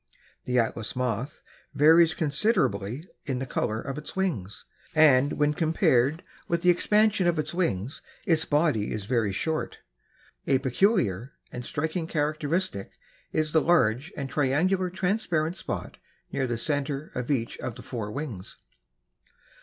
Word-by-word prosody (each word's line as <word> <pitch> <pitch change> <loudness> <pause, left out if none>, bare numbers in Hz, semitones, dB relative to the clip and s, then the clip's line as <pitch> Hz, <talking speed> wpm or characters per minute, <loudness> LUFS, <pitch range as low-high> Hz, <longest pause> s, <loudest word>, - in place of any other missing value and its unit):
The 125 0 0
Atlas 115 -2 0
Moth 125 +3 -3 0.3
varies 160 +3 +6
considerably 145 - 0 0.2
in 135 -3 -1
the 130 - -3
color 110 -3 -2
of 135 +4 -5
its 150 - -9
wings 150 - -3 0.3
and, 145 -3 +5
when 150 0 +1
compared 155 -2 +2 0.2
with 170 0 -1
the 180 - +6
expanse 210 +4 +3
of 175 -3 +2
its 155 +1 -2
wings, 140 - -2 0.2
its 165 -5 +2
body 145 -10 +1
is 105 -2 -4
very 115 -3 +1
short. 160 +10 -2 0.7
A 135 - +4
peculiar 130 - +1 0.2
and 125 - -6
striking 160 +5 -2
characteristic 155 - -2 0.4
is 155 -1 0
the 160 - +4
large 150 - +2
and 140 -2 -3
triangular 165 +8 +1
transparent 180 -3 0
spot - - -5 0.3
near 130 - -1
the 120 -1 -2
center 145 +2 -2
of 125 -1 -4
each 125 -5 -1
of 120 - -5
the - - -10
four 110 -5 -5
wings. 120 -9 -6
150 Hz, 140 wpm, -27 LUFS, 125-165 Hz, 0.7 s, varies